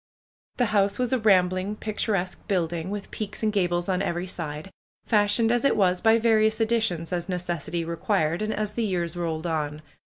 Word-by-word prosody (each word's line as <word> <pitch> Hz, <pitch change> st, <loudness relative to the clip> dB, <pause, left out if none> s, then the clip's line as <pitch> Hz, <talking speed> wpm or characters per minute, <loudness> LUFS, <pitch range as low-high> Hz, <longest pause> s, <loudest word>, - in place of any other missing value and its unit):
The 245 Hz, -, +3 dB
house 200 Hz, -1 st, +2 dB
was 250 Hz, 0 st, 0 dB
a 260 Hz, -, +2 dB
rambling, 185 Hz, -1 st, +2 dB
picturesque 210 Hz, -3 st, -2 dB
building, 175 Hz, -3 st, -1 dB
with 205 Hz, 0 st, -5 dB
peaks 215 Hz, 0 st, -5 dB
and 215 Hz, -1 st, +1 dB
gables 175 Hz, -3 st, 0 dB
on 185 Hz, -1 st, 0 dB
every 175 Hz, -2 st, -2 dB
side, 160 Hz, -1 st, -5 dB, 0.3 s
fashioned 215 Hz, +1 st, +3 dB
as 240 Hz, +1 st, +1 dB
it 275 Hz, -, +3 dB
was 185 Hz, -3 st, +2 dB
by 225 Hz, 0 st, +5 dB
various 220 Hz, -1 st, +3 dB
additions 220 Hz, -7 st, 0 dB
as 175 Hz, +1 st, -3 dB
necessity 175 Hz, -2 st, -3 dB
required, 165 Hz, 0 st, 0 dB
and 215 Hz, 0 st, -1 dB
as 210 Hz, -1 st, -2 dB
the 235 Hz, -, -1 dB
years 175 Hz, -4 st, -1 dB
rolled 165 Hz, -2 st, -3 dB
on. 155 Hz, -2 st, -2 dB
190 Hz, 175 wpm, -25 LUFS, 175-215 Hz, 0.3 s, by